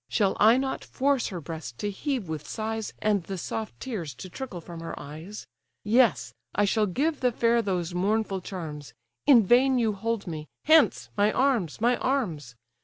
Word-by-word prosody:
Shall 200 -4 +2
I 225 +4 +7
not 265 0 -2
force 275 -1 0
her 185 -4 -5
breast 155 -6 -7
to 205 - -2
heave 255 - -3
with 155 -2 -5
sighs, 220 -1 -3
And 210 -2 +2
the 195 - -5
soft 220 +5 -5
tears 180 - -5
to 185 - -9
trickle 250 -8 -6
from 170 0 -9
her 165 0 -6
eyes? 160 +9 -9 0.4
Yes, 230 0 +3 0.2
I 205 - +3
shall 210 +1 +2
give 290 - 0
the 250 -2 +2
fair 235 0 +2
those 180 -4 -2
mournful 195 +1 0
charms— 155 -6 -7 0.3
In 240 -7 +7
vain 255 +5 +4
you 225 -3 +2
hold 225 +1 -2
me—Hence! 180 - +2
my 205 +1 +3
arms! 245 - +1
my 240 +2 +3
arms! 170 - -2
210 Hz, 175 wpm, -27 LUFS, 175-240 Hz, 0.4 s, I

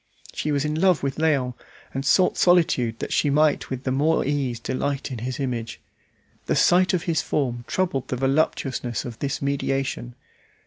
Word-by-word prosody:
She 150 - -2
was 145 0 0
in 150 - -1
love 185 -6 +3
with 135 -1 -2
Léon, 145 -6 +1 0.4
and 135 - -3
sought 180 +6 +3
solitude 155 -10 +3
that - - -4
she 145 - +2
might 150 +1 +2
with 130 0 -4
the 130 - -1
more 150 +5 +2
ease 135 -4 -1
delight 135 +4 -3
in 125 - -5
his 130 +4 -4
image. 120 -4 -3 0.7
The - - +1
sight 185 +1 +4
of 170 - -2
his 165 -2 0
form 120 -4 -2
troubled 140 -9 -1
the - - -2
voluptuousness 135 -3 0
of 120 -3 -7
this 140 0 -3
mediation. 135 - -2
135 Hz, 175 wpm, -24 LUFS, 125-155 Hz, 0.7 s, sight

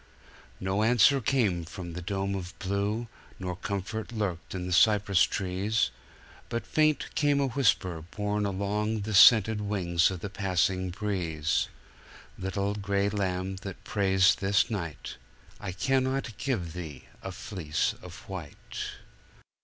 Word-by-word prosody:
"No 95 +2 0
answer 120 +4 +5
came 105 -9 +1
from 85 +1 -7
the 90 - -5
dome 95 +2 -2
of 95 -1 -5
blue, 100 +3 -1 0.3
nor 90 -1 -4
comfort 100 +4 -4
lurked 100 -6 -3
in 90 -1 -3
the 90 - -2
cypress 100 -1 +4
trees; 95 - +1 0.6
But 115 0 -3
faint 155 -1 +1
came 145 -1 +2
a 140 - +2
whisper 100 -10 +1
borne 105 0 -1
along 100 +3 -1
on 110 - -3
the 105 +2 -3
scented 105 +2 +7
wings 90 -5 +2
of 95 -3 -5
the 100 - -4
passing 95 -1 0
breeze:"Little 95 +2 -3
gray 100 0 0
lamb 95 -2 -2
that 95 -1 -8
prays 95 -3 +4
this 100 +3 +1
night,I 80 - -7
cannot 130 +4 0
give 95 - -2
thee 80 -7 -7 0.2
a 95 - -5
fleece 90 -5 -2
of 90 -2 -11
white." 90 -7 -6
100 Hz, 130 wpm, -29 LUFS, 90-105 Hz, 0.6 s, scented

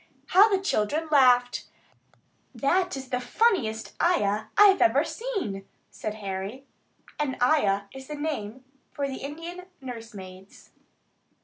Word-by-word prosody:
How 400 +4 +7
the 390 -2 +2
children 315 - 0
laughed! 250 -3 +4 0.9
"That 360 +3 +1
is 265 -1 -8
the 250 -1 -1
funniest 250 - 0
'ayah' 215 - +1
I 415 0 +9
have 385 - +2
ever 265 +6 +4
seen," 325 - -4 0.2
said 215 0 -5
Harry. 200 +5 -5 0.5
An 280 -3 -1
"ayah" 210 -8 +3
is 265 0 -10
the 300 - -5
name 260 -5 -4 0.3
for 280 -1 -2
the 265 -1 -5
Indian 335 +6 -7
nursemaids. 205 -7 -10
265 Hz, 125 wpm, -26 LUFS, 215-325 Hz, 0.9 s, I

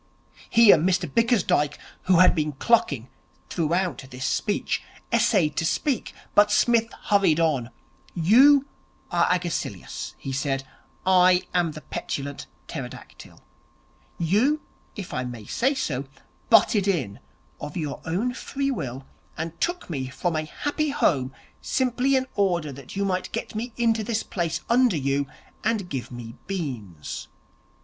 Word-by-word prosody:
Here 230 -5 +7
Mr 180 +2 +1
Bickersdyke, 210 - +2 0.3
who 185 - +4
had 185 +1 +7
been 150 -2 -1
clucking 140 - +2 0.4
throughout 175 -1 0
this 130 0 -5
speech, 205 +8 0 0.3
essayed 160 - +3
to - - +1
speak; 260 - 0 0.2
but 205 0 +5
Psmith 230 +1 +3 0.2
hurried 195 -6 +4
on. 145 -8 +1 0.5
'You 260 - +6 0.5
are 170 -1 +3
Agesilaus,' 180 -2 -3
he 135 - -6
said. 135 0 -1 0.4
'I 185 -1 +5
am 175 -3 +1
the 155 - -9
Petulant 140 -1 -5 0.2
Pterodactyl. - - -9 0.8
You, 220 - +2 0.3
if 200 -4 -7
I 125 - -1
may 120 -4 -7
say 265 - +1
so, 140 - -2 0.4
butted 210 -2 +5
in 130 - -1 0.4
of 150 +3 -6
your 150 -4 -4
own 200 +10 -1
free 275 +2 -2
will, 135 - -5 0.3
and 165 +1 -5
took 350 0 -1
me 135 -6 -3
from 160 +6 -2
a 155 0 -1
happy 290 - -2
home, 140 - +1 0.3
simply 260 +1 +1
in 260 0 +2
order 175 -7 +1
that 135 +4 -10
you 200 0 0
might 185 -1 -1
get - - -4
me 230 +3 -4
into 230 -2 +2
this 220 0 -1
place 170 -4 -2
under 240 -6 +4
you, 140 0 0 0.4
and 215 -5 0
give 130 -3 -4
me 120 -1 -9
beans. 120 - -5
175 Hz, 140 wpm, -25 LUFS, 140-225 Hz, 0.8 s, Here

